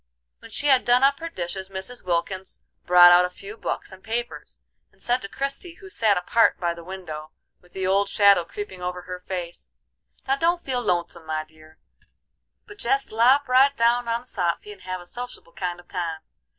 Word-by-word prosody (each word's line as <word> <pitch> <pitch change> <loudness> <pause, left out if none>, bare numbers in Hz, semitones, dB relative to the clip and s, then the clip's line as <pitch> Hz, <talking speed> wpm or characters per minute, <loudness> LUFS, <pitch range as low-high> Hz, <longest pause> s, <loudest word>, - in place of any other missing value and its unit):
When - - -13
she 280 - -4
had 265 -3 +5
done 245 +2 +4
up 275 0 +4
her 330 - -5
dishes 190 - -5
Mrs. 195 +6 -7
Wilkins 185 +2 -2 0.3
brought 175 0 +9
out 175 0 +7
a 180 - -1
few 195 +3 -10
books - - -4
and 190 0 -13
papers, 235 +2 -5 0.3
and - - -29
said 245 +1 +1
to 200 - -7
Christie, 275 - -4
who 390 +2 -13
sat 215 - +2
apart 225 +6 +3
by 175 -1 0
the 170 0 -11
window, 165 -4 -7 0.3
with 180 - -24
the 190 -1 -3
old 195 +1 +2
shadow 200 -4 +5
creeping 190 +1 -8
over 180 0 -4
her 180 0 -7
face: 180 -2 -6 0.6
"Now 270 +1 +2
don't 340 +3 +1
feel 255 -2 -1
lonesome, 170 -5 -2
my 155 0 -2
dear, 155 0 -19 0.9
but 415 0 -14
jest 405 +1 0
lop 255 +6 +4
right 270 +2 +4
down 235 +1 +3
on 230 0 0
the 250 - -19
soffy 180 -1 -2
and 200 -2 -13
have 185 0 -5
a - - -13
sociable 240 -4 -8
kind 175 -1 -4
of 175 - -15
a - - -41
time. 165 -3 -3
190 Hz, 205 wpm, -24 LUFS, 175-245 Hz, 0.9 s, brought